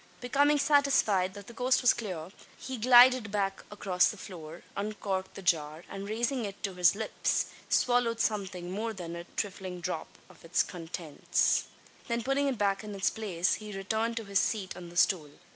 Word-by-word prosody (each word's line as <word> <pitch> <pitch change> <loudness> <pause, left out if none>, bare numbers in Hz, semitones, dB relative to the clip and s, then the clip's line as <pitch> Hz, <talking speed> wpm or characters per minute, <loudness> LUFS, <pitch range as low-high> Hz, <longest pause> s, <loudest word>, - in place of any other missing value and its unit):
Becoming 285 +4 +3
satisfied 275 -10 +3
that 200 -1 -9
the 235 - -11
coast 250 +2 +2
was 245 - +6
clear, 185 -6 -6 0.3
he 260 -1 -6
glided 245 -1 +7
back 195 -2 -1
across 190 -3 +2
the 210 - -6
floor; 170 -3 -9
uncorked 200 -2 -3
the 195 - -8
jar; 155 -2 0
and, 195 +1 -7
raising 240 +3 -1
it 200 -1 -7
to 195 -3 -2
his 180 0 +4
lips, 220 +1 0 0.2
swallowed 245 -2 +2
something 190 -5 -2
more 220 +4 -2
than 170 -4 -6
a 170 0 -7
"thriflin' 185 -3 -4
dhrap 175 -2 -3 0.2
av - - -19
its 170 +1 +2
contints." 165 -3 -1 0.4
Then 235 -1 -1
putting 270 +3 +1
it 265 -3 -1
back 200 0 +1
in 210 -1 -7
its 190 -2 +1
place, 185 -5 0
he 210 -2 -7
returned 220 +4 -1
to 225 - -3
his 200 -1 +2
seat 200 -4 -1
on 175 -1 -9
the 175 - -10
stool. 170 -4 +3
200 Hz, 180 wpm, -30 LUFS, 180-230 Hz, 0.4 s, glided